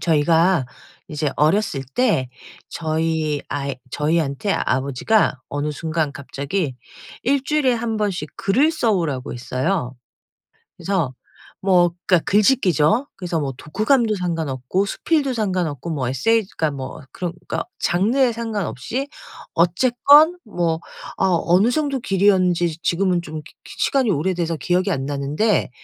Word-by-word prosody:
저희가 165 -1 +3 0.4
이제 150 -1 -2
어렸을 155 -1 +2
때 215 - +2 0.4
저희 160 -2 -1
아이 140 -2 -3
저희한테 150 +5 0
아버지가 135 - +1
어느 145 +1 -2
순간 155 -1 -2
갑자기 140 +3 -3 0.5
1 275 +2 +1
주일에 290 -3 +2
1 225 -1 -2
번씩 190 -7 -2
글을 260 +11 +2
써 245 -9 +1
오라고 150 -9 -2
했어요. 130 +3 -2 0.8
그래서 180 -9 -1 0.5
뭐 180 -3 +4 0.2
그러니까 180 -3 +4
글짓기죠. 210 - +3
그래서 175 -3 -3
뭐 135 -2 -3
독후감도 220 - +1
상관없고 165 -1 -1
수필도 280 +5 0
상관없고 180 - -2
뭐 140 -6 -2
에세이 210 - +2
그러니까 160 -2 +1
뭐 135 +1 -7
그러니까 175 0 -4
장르에 235 +9 +2
상관없이 225 - -3 0.5
어쨌건 255 - +5
뭐 170 -6 -1 0.4
아 190 -2 +3
어느 185 +7 +4
정도 285 -1 0
길이었는지 185 -5 +2
지금은 180 0 +1
좀 155 -2 -7
기 - - -16
기 - - -11
시간이 265 -4 +2
오래돼서 170 0 0
기억이 180 +6 0
안 135 -6 -2
나는데 145 +9 0
175 Hz, 295 characters per minute, -21 LUFS, 150-215 Hz, 0.8 s, 어쨌건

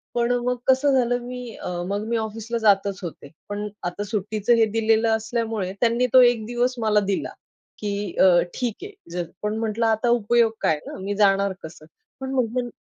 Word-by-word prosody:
पण 240 0 +1
मग 250 0 +1
कसं 265 +2 +4
झालं 245 0 +1
मी 250 -2 -7
अ, - - -6 0.2
मग 200 +2 -2
मी 235 - 0
ऑफिसला 225 +1 -4
जातच 200 -2 +2
होते. 160 -4 -8 0.2
पण 205 +1 -3 0.2
आता 175 +4 -3
सुट्टीचं 215 +2 0
हे 225 - +4
दिलेलं 225 0 +3
असल्यामुळे 220 -3 -2
त्यांनी 240 +1 +2
तो 255 - +9
1 230 -3 -3
दिवस 245 +2 0
मला 215 -2 +3
दिला 195 - -2 0.5
की 205 -2 -3
अ, - - +7 0.3
ठीक 240 -4 -2
आहे, 405 - -7 0.2
जा 180 - -2 0.2
पण 210 +1 -2
म्हटलं 225 0 -1
आता 225 +2 +1
उपयोग 235 0 +3
काय 155 - +2
ना. - - -7
मी 200 +2 -3
जाणार 200 -1 +3
कसं. 155 -1 -10 0.3
पण 265 0 -5
मग 245 -1 0
220 Hz, 185 wpm, -23 LUFS, 205-240 Hz, 0.5 s, तो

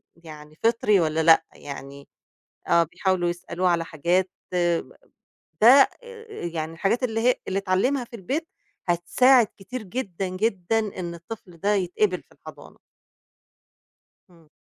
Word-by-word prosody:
يعني 155 -2 -13
فطري 225 -3 +3
والّا 160 0 +1
لأ، 165 0 +6
يعني 140 0 -10 0.6
آه 170 0 +5
بيحاولوا 180 +2 -1
يسألوه 175 +1 -2
على 170 -1 +1
حاجات 175 +4 0 0.2
ده 175 - -1 1.0
آآ 465 -2 -12 0.2
يعني 165 -1 -4
الحاجات 200 +9 0
اللي 225 -2 -1
هي 245 +2 +3
اللي 195 +1 0
اتعلّمها 200 +8 +1
في 235 - -11
البيت 275 - -3 0.4
هتساعد 230 +8 +4
كتير 215 +4 -7
جدًا، 195 -3 -4
جدًا 195 +2 0 0.2
إن 170 -1 -4
الطفل 175 0 -10
ده 205 +5 +1
يتقِبل 185 0 0
في - - -39
الحضانة. - - -14 1.5
إمم. 165 -3 -22
185 Hz, 125 wpm, -24 LUFS, 170-225 Hz, 1.5 s, لأ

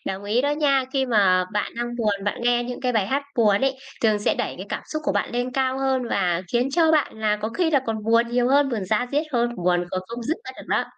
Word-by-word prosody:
Đồng 195 +1 -4
ý 220 +4 +1
đó 285 - +1
nha. 285 -3 +2
Khi 265 -1 +1
mà 190 -6 +3
bạn 210 - -2
đang 240 0 -3
buồn, 205 -4 -1
bạn 205 - -2
nghe 240 0 +2
những 245 0 -6
cái 250 -1 0
bài 210 -4 +1
hát 275 +5 0
buồn 210 -4 +4
ấy, 270 0 +1 0.3
thường 215 -2 +3
sẽ 205 - +1
đẩy - - -3
cái - - -7
cảm - - -4
xúc 310 0 -4
của 290 - +1
bạn - - -1
lên 245 +1 -2
cao 265 0 0
hơn 265 -1 +1
và 180 -2 +1
khiến 245 +3 +1
cho 320 0 +3
bạn 300 -7 +1
là 215 -1 +1
có 220 - 0
khi 325 +6 0
là 280 -3 +3
còn 220 -1 -2
buồn 230 +1 +3
nhiều 245 +1 +1
hơn, 280 0 +4
buồn 220 -6 -2
da 220 +6 0
diết 300 +2 +1
hơn, 240 0 +1
buồn 175 0 +1
còn 185 - -2
không 235 +1 -6
dứt 315 +8 -1
ra - - -6
được - - -11
đó. - - +1
240 Hz, 280 wpm, -23 LUFS, 210-270 Hz, 0.3 s, buồn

